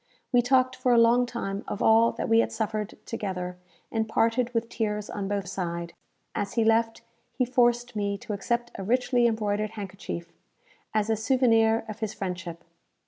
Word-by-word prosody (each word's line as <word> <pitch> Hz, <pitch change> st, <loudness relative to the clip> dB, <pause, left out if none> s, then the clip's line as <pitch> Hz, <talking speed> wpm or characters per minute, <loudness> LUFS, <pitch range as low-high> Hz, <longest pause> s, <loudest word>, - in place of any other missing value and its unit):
We 245 Hz, -2 st, +5 dB
talked 255 Hz, +1 st, +3 dB
for 250 Hz, -, +1 dB
a -, -, +5 dB
long 235 Hz, +2 st, +5 dB
time 200 Hz, -4 st, -4 dB
of 210 Hz, -, -4 dB
all 225 Hz, +1 st, +5 dB
that -, -, -3 dB
we 225 Hz, 0 st, +5 dB
had -, -, +2 dB
suffered 215 Hz, -1 st, -3 dB
together, 180 Hz, -5 st, -4 dB, 0.3 s
and 220 Hz, -1 st, -1 dB
parted 230 Hz, +2 st, +1 dB
with 230 Hz, -1 st, -1 dB
tears 210 Hz, -3 st, -3 dB
on 200 Hz, -1 st, -3 dB
both 200 Hz, -2 st, -2 dB
side. 170 Hz, -2 st, -4 dB, 0.4 s
As 200 Hz, -1 st, -3 dB
he 230 Hz, -, +2 dB
left, 225 Hz, 0 st, +2 dB, 0.3 s
he 255 Hz, -, +1 dB
forced 240 Hz, -1 st, +2 dB
me 200 Hz, -1 st, -1 dB
to 210 Hz, -, -6 dB
accept 235 Hz, +4 st, -2 dB
a -, -, -3 dB
richly 245 Hz, +2 st, +2 dB
embroidered 215 Hz, -1 st, -1 dB
handkerchief, 190 Hz, -4 st, -6 dB, 0.6 s
as 215 Hz, 0 st, +1 dB
a -, -, +3 dB
souvenir 225 Hz, -1 st, +3 dB
of 215 Hz, 0 st, -7 dB
his 220 Hz, -2 st, -3 dB
friendship. 175 Hz, -3 st, -5 dB
220 Hz, 175 wpm, -27 LUFS, 200-235 Hz, 0.6 s, We